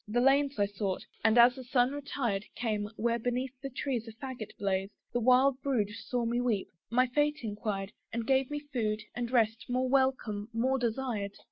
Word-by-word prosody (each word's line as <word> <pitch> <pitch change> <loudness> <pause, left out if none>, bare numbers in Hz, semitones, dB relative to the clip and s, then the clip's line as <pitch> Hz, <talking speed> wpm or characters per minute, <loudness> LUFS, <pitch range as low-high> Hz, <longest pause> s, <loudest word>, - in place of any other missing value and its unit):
The 225 +3 +1
lanes 275 +2 +3
I 205 - +3
sought, 200 -2 -3 0.2
and 220 +2 +4
as 240 +1 +8
the 260 0 -8
sun 250 0 +2
retired, 270 -8 -2
Came, 210 -3 -1
where 235 +1 0
beneath 250 +2 -1
the 275 - -4
trees 250 -3 -2
a - - -6
faggot 250 -2 -7
blazed; 195 0 -1 0.2
The 240 - +2
wild 255 +3 +4
brood 245 -8 +1
saw 240 +3 -3
me 240 +1 +1
weep, 225 -6 0 0.2
my 250 +2 +4
fate 295 +2 0
enquired, 205 -2 -3 0.2
And 230 0 -2
gave 265 +1 +2
me 295 0 -3
food, 225 -7 -2
and 240 -1 -3
rest, 225 -3 +2
more 255 +1 +1
welcome, 255 -6 +1
more 260 +4 +1
desired. 230 -4 -2
240 Hz, 190 wpm, -31 LUFS, 215-265 Hz, 0.2 s, as